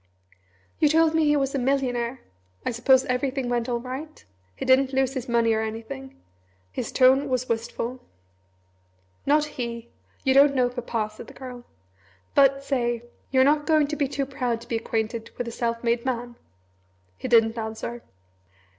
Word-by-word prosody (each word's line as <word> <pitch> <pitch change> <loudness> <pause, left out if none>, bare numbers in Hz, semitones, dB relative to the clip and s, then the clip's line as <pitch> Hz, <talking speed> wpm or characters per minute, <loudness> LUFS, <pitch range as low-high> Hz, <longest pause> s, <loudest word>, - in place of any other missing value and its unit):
"You 300 - +5
told 320 +1 +4
me 320 -1 +3
he 295 0 +4
was 275 -1 0
a 275 - 0
millionaire! 250 -2 0 0.4
I - - 0
suppose 260 +3 +4
everything 255 0 -1
went 240 0 -1
all 240 -1 0
right? 260 +5 -7 0.3
He - - -5
didn't 265 +1 +4
lose 265 0 +1
his 260 -2 -5
money 230 -1 +3
or 220 - +1
anything?" 215 - -6 0.5
His - - -4
tone 265 +2 +4
was 255 -1 0
wistful. 230 +2 -3 1.3
"Not 300 +1 +4
he! 235 -5 -6 0.3
You 265 - +3
don't 280 +1 +6
know 250 -2 +3
Papa!" 230 -3 -3
said - - -11
the - - -13
Girl; 250 -2 -9 0.7
"but, 275 0 +4
say, 240 -4 -1 0.3
you're 260 -1 +4
not 295 +2 +3
going 310 -2 +4
to 300 - -2
be 285 -2 0
too 275 0 -2
proud 250 -4 -2
to 235 - -13
be 235 - -2
acquainted 225 0 -3
with 245 - -3
a - - -4
self 230 0 -2
made 235 0 +1
man?" 245 -2 -3 0.8
He - - -5
didn't 225 -2 +4
answer. 220 +2 -5
250 Hz, 170 wpm, -25 LUFS, 235-275 Hz, 1.3 s, don't